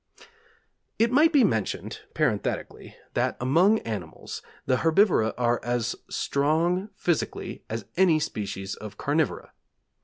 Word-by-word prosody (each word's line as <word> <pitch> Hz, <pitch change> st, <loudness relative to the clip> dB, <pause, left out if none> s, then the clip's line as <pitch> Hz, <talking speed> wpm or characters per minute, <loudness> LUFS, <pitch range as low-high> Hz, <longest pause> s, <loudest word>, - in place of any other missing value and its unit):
It 230 Hz, +1 st, +3 dB
might 305 Hz, +6 st, +5 dB
be 285 Hz, -5 st, +5 dB
mentioned, 110 Hz, -, -1 dB, 0.2 s
parenthetically, -, -, -2 dB, 0.2 s
that -, -, 0 dB
among 170 Hz, -, +4 dB
animals, 100 Hz, -8 st, -6 dB, 0.2 s
the 130 Hz, -1 st, +2 dB
herbivora 165 Hz, -, +3 dB
are 120 Hz, -1 st, +2 dB
as 120 Hz, -1 st, -1 dB
strong 165 Hz, +7 st, +1 dB
physically 175 Hz, -3 st, -2 dB
as 110 Hz, -2 st, -4 dB
any 175 Hz, -4 st, +5 dB
species 100 Hz, -7 st, -4 dB
of 105 Hz, -2 st, -9 dB
carnivora. 150 Hz, -1 st, -1 dB
145 Hz, 115 wpm, -26 LUFS, 115-185 Hz, 0.2 s, might